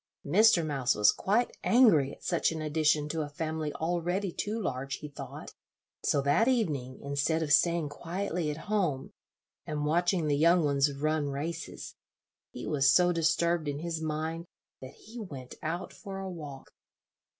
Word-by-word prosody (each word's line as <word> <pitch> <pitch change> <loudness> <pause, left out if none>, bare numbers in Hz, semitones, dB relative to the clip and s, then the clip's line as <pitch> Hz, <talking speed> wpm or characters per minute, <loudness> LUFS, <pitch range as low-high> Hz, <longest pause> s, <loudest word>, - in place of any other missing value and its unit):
Mr. 215 -7 +5
Mouse 135 -5 0
was 105 -1 +5
quite 220 +5 0
angry 190 - +5
at - - -13
such 170 -2 +1
an 160 - -4
addition 155 -1 +1
to 160 +1 -2
a 150 - -4
family 155 0 -3
already 175 +3 -1
too 210 +6 -3
large, 135 - -3
he 150 - -8
thought; 145 - -9 0.5
so 140 - +1
that 145 - +3
evening, 150 - 0
instead 140 +3 0
of 150 -1 +1
staying 170 0 +3
quietly 170 +2 -3
at 150 +2 -6
home, 180 -11 -1 0.5
and 150 -1 -3
watching 175 +2 +1
the 145 -1 +2
young 170 +3 +4
ones 140 0 +2
run 150 +1 -1
races, 145 +5 -5 0.6
he - - -7
was 140 -3 +2
so 180 -1 +5
disturbed 170 -1 +1
in 145 -1 -2
his 165 +1 -4
mind 160 +2 -3 0.3
that 130 0 -10
he 230 +3 -11
went 140 - -8
out 170 +3 -4
for 195 -1 -8
a 195 0 -5
walk. 150 -7 -8
160 Hz, 160 wpm, -29 LUFS, 145-175 Hz, 0.6 s, Mr